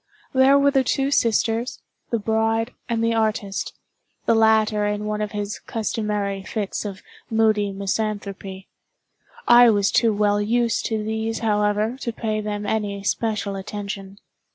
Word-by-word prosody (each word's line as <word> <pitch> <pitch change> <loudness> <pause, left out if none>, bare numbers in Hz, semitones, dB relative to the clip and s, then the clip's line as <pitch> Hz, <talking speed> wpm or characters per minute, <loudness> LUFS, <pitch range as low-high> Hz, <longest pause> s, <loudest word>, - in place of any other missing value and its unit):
There 265 +1 +6
were 280 0 +4
the 270 -1 +3
two 270 +2 0
sisters, 230 -1 +1 0.3
the 235 - +1
bride, 225 +2 0 0.2
and 230 -1 0
the 230 0 +2
artist—the 215 0 -3
latter 220 -1 +3
in 210 0 -2
one 210 0 -2
of 210 -1 -2
his 205 0 -4
customary 210 -3 -2
fits 205 +1 -4
of 195 -2 -6 0.3
moody 215 -2 +2
misanthropy. 195 -1 -4 0.8
I 240 0 +8
was 205 -2 +2
too 230 -2 +3
well 205 0 +2
used 230 +2 +1
to 220 -2 -2
these, 220 +1 -2
however, 210 +2 +1
to 235 - -2
pay 215 -1 -2
them 210 0 -4
any 205 -1 -2
special 210 -1 -1
attention. 195 0 -6
215 Hz, 140 wpm, -23 LUFS, 205-225 Hz, 0.8 s, I